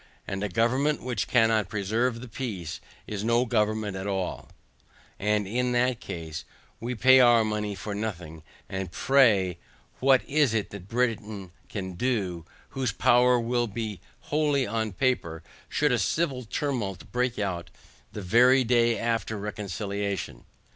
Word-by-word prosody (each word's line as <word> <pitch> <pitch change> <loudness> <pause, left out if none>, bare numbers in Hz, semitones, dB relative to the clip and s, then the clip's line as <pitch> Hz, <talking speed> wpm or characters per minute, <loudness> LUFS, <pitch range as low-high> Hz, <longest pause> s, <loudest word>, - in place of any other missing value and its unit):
And 95 +1 -3
a 105 - -1
government 130 +9 +1
which 120 -5 -2
cannot 115 -5 +3
preserve 115 +3 -1
the 125 - -8
peace, 105 -9 -5 0.2
is 105 -1 -4
no 115 +2 +2
government 110 -3 0
at 95 +1 -4
all, 95 -2 -3 0.7
and 105 0 +1
in 125 +4 0
that 125 0 +1
case 80 -2 -6 0.4
we 120 +2 -3
pay 130 +3 +6
our 120 -2 +6
money 105 -1 -2
for 105 +1 -5
nothing; 90 -7 -5 0.3
and 95 -2 -4
pray 100 -10 +3 0.4
what 135 -1 +4
is 140 -5 +2
it 105 - -1
that 95 -2 -9
Britain 110 -5 -2 0.2
can 95 -3 -5
do, 95 -6 -1 0.2
whose 130 -4 -1
power 125 +2 +4
will 120 +1 0
be 105 -4 -5 0.2
wholly 145 -3 +1
on 110 0 -2
paper, 90 -8 -1 0.3
should 150 -1 +1
a 125 - +2
civil 130 - 0
tumult 110 - -3
break 125 -1 0
out 95 -4 -3 0.4
the 105 - -6
very 125 +7 +5
day 120 -1 +3
after 115 -2 -1
reconciliation? 100 -1 -4
110 Hz, 145 wpm, -27 LUFS, 100-125 Hz, 0.7 s, pay